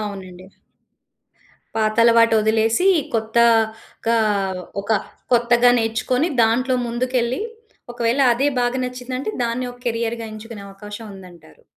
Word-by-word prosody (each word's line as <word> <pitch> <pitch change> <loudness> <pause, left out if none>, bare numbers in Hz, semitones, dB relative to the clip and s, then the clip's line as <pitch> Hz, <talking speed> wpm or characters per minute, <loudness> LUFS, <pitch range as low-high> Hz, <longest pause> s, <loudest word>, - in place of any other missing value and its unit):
అవునండి. 185 -3 -7 1.3
పాత 215 -1 0
అలవాటు 230 -1 +5
ఒదిలేసి, 225 - +2 0.3
కొత్తగా 225 0 +1 0.6
ఒక 200 +2 -2 0.4
కొత్తగా 240 +1 +4
నేర్చుకొని 235 +7 0
దాంట్లో 255 +4 +2
ముందుకెళ్లి, 245 - -1 0.5
ఒకవేళ 240 +3 0
అదే 270 +4 0
బాగా 245 +1 0
నచ్చిందంటే 255 - -4
దాన్ని 235 +2 -2
ఒక 245 - -17
కెరియర్‌గా 230 0 -2
ఎంచుకునే 215 -1 -9
అవకాశం 205 +3 -10
ఉందంటారు. 175 - -15
230 Hz, 100 wpm, -21 LUFS, 220-245 Hz, 1.3 s, అలవాటు